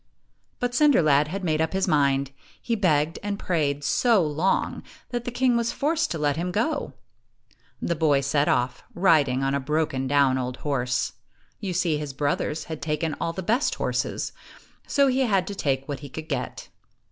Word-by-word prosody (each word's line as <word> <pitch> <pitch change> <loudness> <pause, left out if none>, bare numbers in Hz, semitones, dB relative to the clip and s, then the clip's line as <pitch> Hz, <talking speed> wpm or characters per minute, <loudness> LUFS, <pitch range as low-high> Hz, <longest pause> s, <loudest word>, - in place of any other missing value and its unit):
But 245 0 -1
Cinder 285 - +5
lad 145 -1 +4
had 195 +5 -5
made 155 -3 +1
up 160 +2 0
his 190 +1 +1
mind. 140 -4 +2 0.3
He 235 - -3
begged 160 -7 +1
and 205 -1 -3
prayed 145 -7 -1
so 225 - +3
long 155 +6 0 0.3
that 240 -1 -3
the - - -2
king 245 0 +2
was 235 0 +1
forced 315 +2 0
to 165 - -3
let 145 -1 0
him 180 +2 -2
go. 260 - -1 0.9
The 170 - -1
boy 150 -4 +2
set 140 +2 +1
off, 125 0 0
riding 150 -8 +3
on 135 0 +1
a 140 - +1
broken 140 -2 -1
down 140 -2 +3
old 125 0 -3
horse. 125 -3 0 0.5
You 195 -4 -3
see, 170 -3 +1
his 150 -2 -5
brothers 145 +2 -1
had 160 -2 -7
taken 150 0 -1
all 165 - 0
the 185 +3 -5
best 235 +9 +1
horses, - - -2 0.6
so 280 -1 +3
he 260 -1 +2
had 200 -8 +2
to 205 - -5
take 135 -7 -1
what 140 -3 -4
he 145 - -9
could 160 +4 -7
get. - - -4
155 Hz, 185 wpm, -25 LUFS, 140-200 Hz, 0.9 s, Cinder